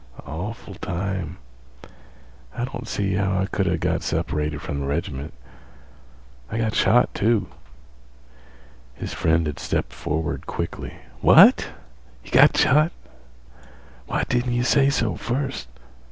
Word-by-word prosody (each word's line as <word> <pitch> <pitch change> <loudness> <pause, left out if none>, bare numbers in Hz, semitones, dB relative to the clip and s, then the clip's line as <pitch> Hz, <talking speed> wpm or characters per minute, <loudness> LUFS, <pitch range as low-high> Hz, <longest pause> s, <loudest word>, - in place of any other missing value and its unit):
Awful 100 +7 -6
time. 90 -1 -4 1.2
I 120 - 0
don't 125 -2 -7
see 100 -3 -1
how 95 0 0
I 95 - +1
could 95 -1 -1
a' 90 -1 +1
got - - -1
separated 75 0 -2
from 75 -3 -4
th' 70 - -3
reg'ment. 70 -1 -3 1.2
I 110 - -3
got 110 -2 0
shot, 120 +5 +3
too." 105 -3 +1 1.5
His - - -6
friend 80 0 +2
had 75 -1 -4
stepped - - -2
forward 80 +1 -3
quickly. - - -5 0.2
"What? - - +7 0.6
Got - - +6
shot? 155 +5 +4 1.2
Why - - -1
didn't 120 0 0
yeh 120 0 +1
say 135 +3 +4
so 115 -9 0
first? 125 - -3
95 Hz, 125 wpm, -23 LUFS, 80-120 Hz, 1.5 s, What